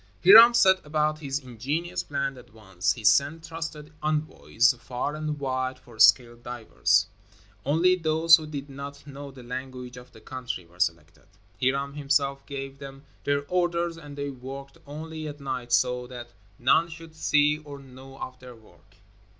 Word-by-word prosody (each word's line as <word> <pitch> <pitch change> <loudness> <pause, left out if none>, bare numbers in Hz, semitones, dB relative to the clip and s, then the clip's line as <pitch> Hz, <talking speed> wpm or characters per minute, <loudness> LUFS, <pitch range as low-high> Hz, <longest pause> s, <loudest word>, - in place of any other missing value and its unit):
Hiram 225 +5 +10
set 190 -4 +5
about 155 0 0
his 140 -3 -2
ingenious 145 +8 -3
plan 140 -1 -3
at 125 -1 -15
once. 95 -4 -2
He 115 - -11
sent 145 +8 +3
trusted 160 -2 -7
envoys 150 -5 +1
far 125 +4 -4
and 155 -1 -4
wide 130 -1 -2
for 120 -3 -17
skilled 120 +1 +5
divers. 120 -1 +1 0.6
Only 165 +6 +3
those 165 -1 +5
who 155 -1 -8
did 145 -2 -6
not 140 0 -9
know 140 0 -9
the 130 -2 -13
language 125 0 -7
of 125 0 -13
the 115 - -15
country 125 -4 -6
were 85 +1 -22
selected. 85 +1 -2 0.3
Hiram 140 +2 0
himself 140 -1 0
gave 135 -1 -6
them 135 0 -10 0.2
their 145 0 0
orders 175 -1 0
and 145 -3 -11
they 140 0 -3
worked 135 +1 -9
only 155 +1 -7
at 145 0 -8
night, 130 -3 -5
so 125 0 +2
that 120 -1 -9 0.3
none 160 +7 +3
should 165 -1 -11
see 150 -1 +2
or 145 -2 -10
know 135 0 -13
of 130 -1 -8
their 125 -1 -12
work. 110 -1 -22
140 Hz, 165 wpm, -26 LUFS, 125-155 Hz, 0.6 s, Hiram